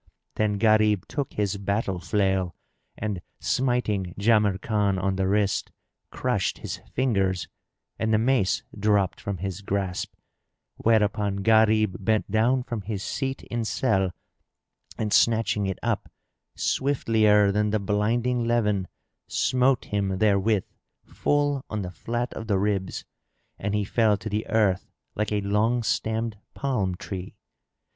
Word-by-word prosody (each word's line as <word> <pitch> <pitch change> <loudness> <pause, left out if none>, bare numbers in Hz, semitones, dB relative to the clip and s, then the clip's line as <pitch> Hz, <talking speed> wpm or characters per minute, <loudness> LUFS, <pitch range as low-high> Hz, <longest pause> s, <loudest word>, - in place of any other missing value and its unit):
Then 105 -1 0
Gharib 110 -2 +3
took 140 -3 -3
his 100 -1 -1
battle 100 -1 -1
flail 95 -2 0 0.4
and 105 -4 -3 0.2
smiting 110 -8 0
Jamrkan 105 -1 +2
on 95 +1 0
the 95 0 0
wrist, 100 0 +1 0.4
crushed - - -1
his - - -5 0.2
fingers 95 -8 +1 0.5
and 110 0 0
the 110 - +4
mace 115 -3 +2
dropped 105 -2 +1
from 100 -2 -3
his 95 +1 -4
grasp; 95 -2 -3 0.6
whereupon 105 -3 +1
Gharib 110 -3 +3
bent 110 0 +1
down 120 +4 +2
from 115 -3 -4
his 100 0 -4
seat 135 -1 -3
in 120 -1 -3
selle 105 -4 +1 0.9
and 105 -2 -1
snatching 105 -3 +3
it 95 - -2
up, - - -1 0.5
swiftlier 110 -7 +3
than 105 +1 +1
the 110 - +1
blinding 115 +5 0
leven, 105 -5 +1 0.4
smote 130 0 +2
him 100 -2 -1
therewith 105 0 +2 0.4
full 145 -2 0
on 105 -2 -3
the 90 - -5
flat 120 +7 -3
of 110 - -7
the 100 -3 +2
ribs, 95 -1 -1 0.5
and 105 +1 -1
he 105 -1 0
fell 110 0 +2
to 110 - -6
the 105 +1 -2
earth 105 -4 +2 0.2
like 105 0 -2
a 105 -1 +1
long 110 +4 +1
stemmed 110 -1 -1 0.2
palm 105 -10 -1
tree. 95 0 -7
105 Hz, 135 wpm, -26 LUFS, 100-115 Hz, 0.9 s, the